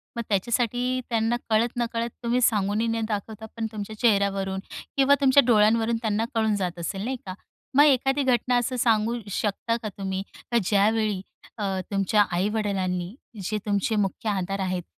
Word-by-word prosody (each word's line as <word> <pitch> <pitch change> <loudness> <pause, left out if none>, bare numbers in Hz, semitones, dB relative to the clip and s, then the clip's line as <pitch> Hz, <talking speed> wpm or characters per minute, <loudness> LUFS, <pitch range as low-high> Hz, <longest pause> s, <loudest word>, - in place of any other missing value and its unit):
मग 235 - -2
त्याच्यासाठी 245 +5 0
त्यांना 225 +1 +1
कळत-नकळत, 235 +1 0
तुम्ही 240 +2 +1
सांगूनही 210 0 +2
न 225 0 -1
दाखवता, 220 +1 -4
पण 225 - -2
तुमच्या 215 0 -6
चेहऱ्यावरून 195 -3 +1 0.4
किंवा 275 +1 +5
तुमच्या 275 0 +6
डोळ्यांवरून 225 +1 +4
त्यांना 220 0 0
कळून 220 -2 +2
जात 180 -3 -3
असेल, 195 +4 -4
नाही 260 0 -2
का. 185 - -5 0.4
मग 290 - +8
एखादी 270 0 +3
घटना 250 -1 +2
असं 250 +1 -1
सांगू 225 0 +2
शकता 215 +4 -1
का 215 - -2
तुम्ही? 190 -1 -3 0.3
का 235 - +3
ज्यावेळी 210 0 +2 0.4
अ, 195 -3 -1
तुमच्या 200 +1 +2
आई-वडिलांनी, 190 -1 -1 0.3
जे 215 +3 -1
तुमचे 205 +2 0
मुख्य 205 +2 -1
आधार 195 0 -2
आहेत, 185 -2 -2
215 Hz, 150 wpm, -25 LUFS, 195-235 Hz, 0.4 s, मग